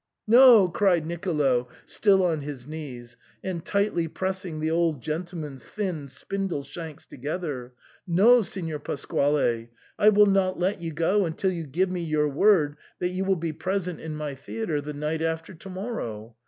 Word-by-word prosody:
" - - -60
No," 235 -4 +8
cried 175 -2 +2
Nicolo, 150 -8 0 0.2
still 195 -2 +3
on 160 -4 0
his 140 -4 -7
knees, 130 -6 -8 0.3
and 180 -3 -3
tightly 200 -5 0
pressing 185 -1 -3
the 155 +1 -1
old 165 -3 +1
gentleman's 155 -2 -5
thin 180 - -4
spindle 180 +3 -3
shanks 160 +2 -8
to - - -13
gether, 140 -3 -4 0.2
" - - -31
no, 240 +4 +7
Signor 165 -7 -3
Pasquale, 140 -5 0 0.3
I 210 - +7
will 210 0 +6
not 195 -2 +2
let 185 +1 0
you 165 -1 -3
go 170 +5 +2
until 180 +4 -1
you 165 -4 -5
give 180 +7 0
me 180 -1 -2
your 155 -2 +1
word 150 -2 +3 0.2
that 180 - -1
you 185 +1 -2
will 190 0 +3
be 165 -2 -3
present 180 0 -2
in 160 -1 -6
my 150 -2 -4
theatre 150 +4 -3
the 150 +1 -6
night 150 +2 -2
after 165 +2 -2
to 180 +3 -11
morrow. 120 - -5
165 Hz, 175 wpm, -26 LUFS, 150-190 Hz, 0.3 s, No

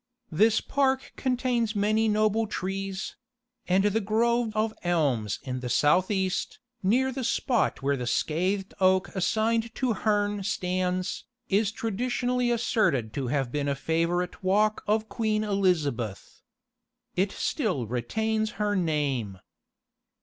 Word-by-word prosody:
This 215 +7 +4
park 270 -1 0
contains 245 -4 0
many 215 +2 +2
noble 215 +1 +2
trees; 195 -1 -4 0.5
and 185 +2 +3
the 210 +2 +2
grove 230 +2 +1
of 215 0 +1
elms 140 - +1
in 130 -1 -4
the 125 -1 -5
south 160 +8 +3
east, 190 -3 -1 0.2
near 250 +7 +2
the 260 0 -4
spot 240 - 0
where 140 +1 +2
the 125 -2 -4
scathed 185 +9 0
oak 185 0 +3
assigned 225 +4 0
to 255 -3 +1
Herne 205 0 0
stands, 185 -1 -1 0.2
is 205 +1 +2
traditionally 245 +3 -1
asserted 180 - +1
to 135 0 -2
have 135 -1 -1
been 145 0 -1
a 140 - 0
favourite 170 +4 -1
walk 210 +3 +2
of 215 +1 +1
Queen 215 -2 0
Elizabeth. 155 - -1 0.7
It 190 +2 +1
still 185 - -1
retains 220 - -1
her 205 0 0
name. 145 - -1
195 Hz, 130 wpm, -27 LUFS, 165-220 Hz, 0.7 s, This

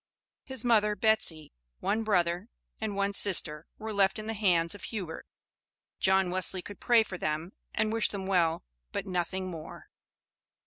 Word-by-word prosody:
His 265 -3 0
mother, 210 -3 +3
Betsy, 185 -8 +2 0.3
one 220 - 0
brother, 180 -1 0 0.3
and 215 -2 -3
one 200 0 0
sister 165 -6 +3
were 220 0 -6
left 195 0 +2
in 215 - -6
the 225 - -3
hands 175 -6 +2
of 205 - -9
Hubert. 190 -8 -6 0.7
John 190 -1 +3
Wesley 185 0 0
could 205 - -10
pray 235 -2 +4
for 185 -4 -8
them 155 +4 -3 0.2
and 215 0 0
wish 225 -3 +2
them 200 -2 -4
well, 175 -4 +1 0.3
but - - -3
nothing 185 0 -3
more. 160 -2 -10
195 Hz, 155 wpm, -29 LUFS, 175-215 Hz, 0.7 s, pray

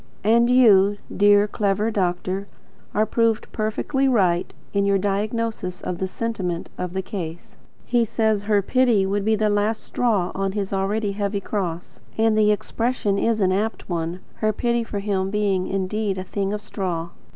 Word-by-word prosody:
And 235 +3 +4
you, 205 -5 +5 0.2
dear, 205 0 +5
clever 205 +1 0
doctor, 185 0 -1 0.4
are 215 +1 +2
proved 230 -1 +1
perfectly 235 +5 0
right 185 -9 +2 0.2
in 200 -1 +2
your 200 0 +3
diagnosis 205 -1 -2
of 175 -1 -4
the 190 - -1
sentiment 185 -5 -3
of 180 -1 -4
the 190 0 -2
case. 175 -5 -7 0.3
He 240 -1 +2
says 220 -2 +1
her 205 -1 +2
pity 240 -3 +3
would 200 +1 -1
be 220 +1 +2
the 215 0 +1
last 210 +1 0
straw 215 -8 0
on 195 0 -2
his 200 -1 -3
already 200 +2 0
heavy 200 0 -2
cross; 180 -4 -4 0.2
and 220 0 +3
the 210 -1 +4
expression 210 -1 -1
is 225 0 +1
an 185 -1 +3
apt 210 +4 -1
one, 170 +1 -3 0.2
her 215 0 +1
pity 235 +2 0
for 220 - -5
him 195 -2 -1
being 200 -3 0
indeed 195 +1 -1
a 185 - -3
thing 195 +1 -2
of 210 0 -3
straw. 170 -4 -3
205 Hz, 170 wpm, -23 LUFS, 190-220 Hz, 0.4 s, you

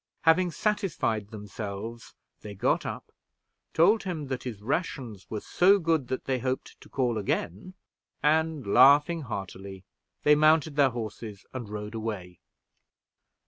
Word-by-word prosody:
Having 175 +2 +4
satisfied 175 - -1
themselves, 105 +2 -7 0.2
they 105 -1 -9
got 100 - +1
up, - - -7 0.6
told 210 +7 +4
him 160 -7 -5
that 130 -2 -3
his 115 -5 -5
rations 120 - -3
were 105 -2 -4
so 195 +3 +4
good 165 -7 0
that 130 +1 -4
they 130 -1 0
hoped 130 +1 -4
to - - -15
call 120 -4 0
again; 100 - -3 0.5
and, 155 -1 +2
laughing 145 +9 +5
heartily, 95 -5 -7 0.4
they 150 - +6
mounted 155 0 +4
their 140 -2 +5
horses, 110 -3 -7
and 120 -5 -6
rode 105 +1 -6
away. 105 -6 -5
125 Hz, 135 wpm, -28 LUFS, 105-155 Hz, 0.6 s, they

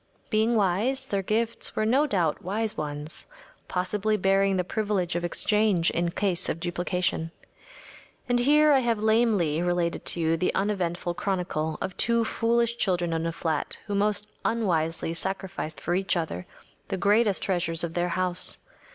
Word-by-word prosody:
Being 220 +2 +2
wise, 220 +7 +1
their 200 -6 -1
gifts 220 +4 -1
were 215 - +1
no 270 +7 +3
doubt 175 - 0
wise 215 +4 -2
ones, 150 +1 -4 0.4
possibly 210 +4 0
bearing 195 0 +2
the 180 - +1
privilege 195 -3 -1
of 175 - -1
exchange 200 0 +2
in 170 0 0
case 185 0 0
of 165 - -2
duplication. 175 -1 -1 1.0
And 245 0 +2
here 300 +4 +5
I 275 - +6
have 235 -3 +1
lamely 215 -8 +2
related 175 -1 0
to - - +1
you 165 0 +2
the 180 - 0
uneventful 180 -3 -1
chronicle 175 -5 -2
of 185 - -3
two 235 0 +2
foolish 235 +1 +1
children 180 -6 0
in 165 0 -1
a - - -1
flat 160 -2 -2
who 205 - -4
most 210 +1 +1 0.2
unwisely 165 -8 0
sacrificed 190 -2 -3
for 175 - -2
each 190 0 +1
other 155 - -4 0.4
the 195 - -2
greatest 205 +1 +3
treasures 170 -3 0
of 170 -1 -3
their 175 0 0
house. 185 0 0
190 Hz, 160 wpm, -26 LUFS, 170-215 Hz, 1.0 s, I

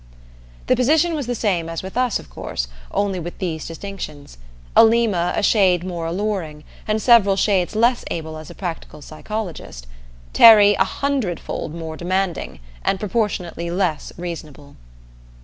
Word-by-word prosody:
The 255 - +3
position 310 +7 +3
was 290 -6 -3
the 245 - -1
same 180 -7 -1
as 165 +1 -5
with 190 - -8
us, 250 -2 +1
of - - -12
course, - - -5 0.2
only 195 -2 -1
with 175 +1 -7
these 165 -5 -4
distinctions. 165 - -8 0.4
Alima, 220 -6 +4
a - - -1
shade 185 -5 +3
more 175 -3 -4
alluring, 175 -5 -3 0.2
and 215 0 +1
several 215 -4 +5
shades 195 -1 +1
less 235 +3 +2
able 160 -1 -5
as 155 -1 -10
a - - -11
practical 165 -4 -6
psychologist; 165 - -6 0.5
Terry, 210 -3 +8
a 190 - +3
hundredfold 195 - -3
more 160 -1 -6
demanding 185 +1 -2 0.2
and 195 - 0
proportionately 185 -5 -2
less 175 -3 -1
reasonable. 155 -5 -8
185 Hz, 145 wpm, -21 LUFS, 165-215 Hz, 0.5 s, Terry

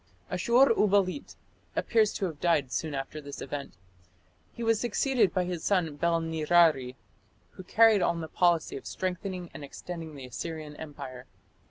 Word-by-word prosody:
Ashur 250 +2 +4
uballit 205 +3 +1 0.4
appears 220 -3 +2
to 195 - -2
have 160 -5 -5
died 150 -7 +1
soon 155 0 -2
after 135 +3 -5
this 140 -1 -8
event. 145 -1 -6 0.8
He 235 - -7
was 225 -1 +2
succeeded 240 -1 +2
by 185 - +1
his 175 -2 -4
son 175 -7 +1
Bel 170 +1 +2
nirari, 160 -5 +3 0.6
who 185 - -11
carried 220 +1 +5
on 170 -1 +1
the 160 - -5
policy 170 -2 +2
of - - -9
strengthening 185 -1 -4
and - - -8
extending 160 +2 -7
the 135 -2 -8
Assyrian 155 +4 -6
empire. 130 -5 -8
170 Hz, 155 wpm, -29 LUFS, 150-195 Hz, 0.8 s, carried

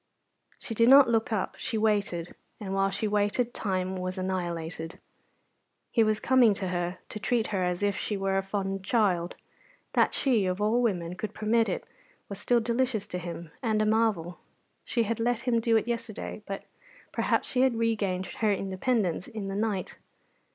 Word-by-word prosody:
She 230 - -6
did 230 +2 +4
not 275 -1 +8
look 225 0 +1
up 210 -4 -1
she 225 - -2
waited; 200 -6 0 0.3
and 195 -2 -4
while 195 0 +2
she 200 +3 -2
waited 210 +4 +1
time 185 -2 -2
was 185 +1 -4
annihilated. 170 -3 -3 0.9
He 230 - +4
was 215 -1 +1
coming 245 -5 +4
to 190 -2 -3
her 175 0 -2
to 215 - -6
treat 230 +1 +1
her 190 - +1
as 180 +2 -1
if 200 -1 +2
she 210 - -2
were 195 0 0
a 195 - +2
fond 195 0 -3
child; 190 -5 +1 0.6
that - - +3
she, 230 -8 +2
of 185 +1 -1
all 215 +4 +2
women, 180 -7 0
could 215 +2 -5
permit 225 +1 +2
it - - -3 0.4
was 200 - -6
still 240 -1 +3
delicious 235 -2 0
to 180 - -4
him, 170 -2 -7
and 220 -4 +1
a 215 - +2
marvel. 215 -6 +1 0.4
She 235 - 0
had 225 +1 -2
let 235 0 +1
him 240 -2 +2
do 230 0 +3
it 220 - -1
yesterday, 230 -2 -4
but 195 0 -5 0.5
perhaps - - +1
she 255 - +1
had 260 -2 +3
regained 210 -5 0
her 215 +1 0
independence 195 -1 0
in 215 -5 -5
the 195 - -3
night. 205 -3 -2
205 Hz, 180 wpm, -28 LUFS, 185-230 Hz, 0.9 s, not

